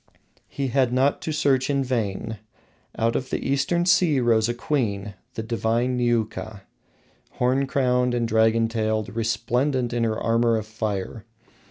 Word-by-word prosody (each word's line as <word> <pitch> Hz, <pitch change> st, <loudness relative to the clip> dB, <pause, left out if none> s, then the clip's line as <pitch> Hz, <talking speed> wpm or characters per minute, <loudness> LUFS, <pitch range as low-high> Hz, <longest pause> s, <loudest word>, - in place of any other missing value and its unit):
He 135 Hz, -1 st, -3 dB
had 130 Hz, -1 st, +2 dB
not 130 Hz, +3 st, +2 dB
to 160 Hz, -, -3 dB
search 135 Hz, -3 st, +1 dB
in 140 Hz, -1 st, +1 dB
vain. 110 Hz, -3 st, -3 dB, 0.6 s
Out 115 Hz, +1 st, +1 dB
of 130 Hz, -, -2 dB
the -, -, -3 dB
Eastern 140 Hz, +6 st, +1 dB
sea 180 Hz, -6 st, +4 dB
rose 115 Hz, -2 st, +2 dB
a -, -, 0 dB
queen, 105 Hz, -7 st, -2 dB, 0.2 s
the 110 Hz, -, -3 dB
divine 115 Hz, +2 st, 0 dB
Niuka, 110 Hz, -4 st, -1 dB, 0.7 s
horn 130 Hz, +2 st, +1 dB
crowned 125 Hz, -3 st, +1 dB
and 120 Hz, -1 st, 0 dB
dragon 110 Hz, +1 st, +3 dB
tailed, 110 Hz, -2 st, -2 dB
resplendent 120 Hz, +3 st, 0 dB
in 120 Hz, -1 st, 0 dB
her 110 Hz, -1 st, 0 dB
armor 115 Hz, 0 st, +2 dB
of 110 Hz, -, -4 dB
fire. 110 Hz, -1 st, -4 dB
120 Hz, 150 wpm, -24 LUFS, 110-130 Hz, 0.7 s, sea